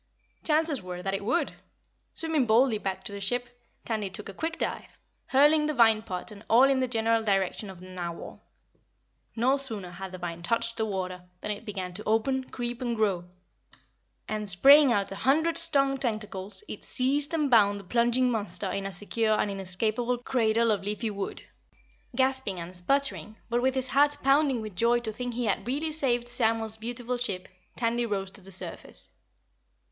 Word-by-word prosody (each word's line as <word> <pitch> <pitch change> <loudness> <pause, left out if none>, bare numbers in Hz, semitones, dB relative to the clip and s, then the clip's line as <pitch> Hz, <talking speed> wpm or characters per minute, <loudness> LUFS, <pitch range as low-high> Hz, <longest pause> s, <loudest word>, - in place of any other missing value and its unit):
The - - 0
chances 310 -4 +2
were 180 -1 -7
that 195 0 -2
it 195 +1 -2
would. 290 +11 0 0.6
Swimming 320 -6 0
boldly 225 0 +4
back 195 -2 -4
to 235 - -6
the 200 0 -7
ship, 245 +5 -1 0.4
Tandy 215 -4 -2
took 200 +2 -8
a - - -7
quick 325 - -3
dive, - - -4 0.3
hurling 300 +3 +5
the 305 - -1
vine 225 -3 +5
pot 185 0 -5
and 205 0 -12
all 235 +3 +6
in 270 -1 +4
the 255 - +1
general 225 -1 +2
direction 195 0 0
of 190 -2 -10
the 185 +1 -11
Narwhal. 175 -2 -6 0.9
No 255 +4 +3
sooner 220 -10 -4
had 190 +1 -7
the 185 - -7
vine 170 -1 -5
touched 230 +4 -1
the 220 - 0
water 185 -2 -4
than 210 - -2
it 210 +2 -5
began 190 -3 -4
to 210 +4 -7
open, 255 +5 +1
creep 240 -1 -5
and 240 -2 -1
grow 200 -6 0 1.0
and, 215 -1 -3
spraying 275 +9 +7
out 200 -4 +1
a 195 - -5
hundred 320 +7 +2
strong 275 -5 +3
tentacles, 215 - -3
it - - -7
seized 280 +3 +1
and 305 -4 0
bound 205 -3 +5
the - - -11
plunging 240 +5 +2
monster 210 -3 0
in 195 +1 -2
a - - -6
secure 215 +3 0
and 205 - 0
inescapable 215 +6 0
cradle 230 -2 +2
of 205 -2 0
leafy 210 +2 -2
wood. 200 -1 -5 0.7
Gasping 260 -7 0
and 170 +2 -7
sputtering, 245 +3 -1
but 240 +1 +2
with 260 +1 +1
his 260 -1 -1
heart 290 +1 +3
pounding 275 -2 +3
with 215 -3 -7
joy 235 +5 +3
to 220 -2 -4
think 245 +1 -5
he 245 0 -1
had 210 +2 -1
really 295 +5 -1
saved 245 -6 0
Samuel's 225 -2 0
beautiful 240 +2 -3
ship, 195 -7 -2 0.3
Tandy 235 0 0
rose 195 -3 -2
to 205 - +1
the 195 +1 -10
surface. 185 - -5
225 Hz, 185 wpm, -28 LUFS, 200-260 Hz, 1.0 s, spraying